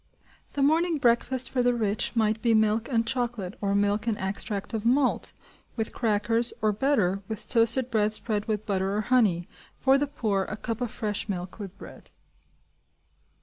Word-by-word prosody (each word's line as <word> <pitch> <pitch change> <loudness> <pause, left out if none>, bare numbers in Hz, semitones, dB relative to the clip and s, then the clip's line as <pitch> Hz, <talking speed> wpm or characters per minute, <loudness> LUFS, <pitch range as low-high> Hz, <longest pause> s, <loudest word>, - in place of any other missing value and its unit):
The 280 - 0
morning 325 +3 +2
breakfast 255 0 +1
for 255 - +1
the 245 0 +2
rich 215 0 -1
might 220 -1 +1
be 230 -2 +3
milk 220 +2 +2
and 230 -3 +1
chocolate, 235 -6 -2
or 200 -1 0
milk 205 +2 +1
and 220 -2 0
extract 200 +2 -3
of 220 -2 -2
malt, 255 +2 +2 0.4
with 220 -2 -3
crackers, 225 +1 +1
or, 215 -1 +2
better, 205 -5 +1
with 220 -1 -6
toasted 235 +2 +3
bread 215 -1 +2
spread 210 -1 +2
with 215 -1 -2
butter 195 -1 -1
or - - +1
honey; 210 -7 +2 0.3
for 270 +1 +4
the 290 - 0
poor, 215 -9 -1
a 210 - -6
cup 230 +2 -4
of 245 - -1
fresh 210 -1 -4
milk, 180 +1 -5
with 200 -2 -8
bread. - - -13
220 Hz, 175 wpm, -27 LUFS, 205-245 Hz, 0.4 s, for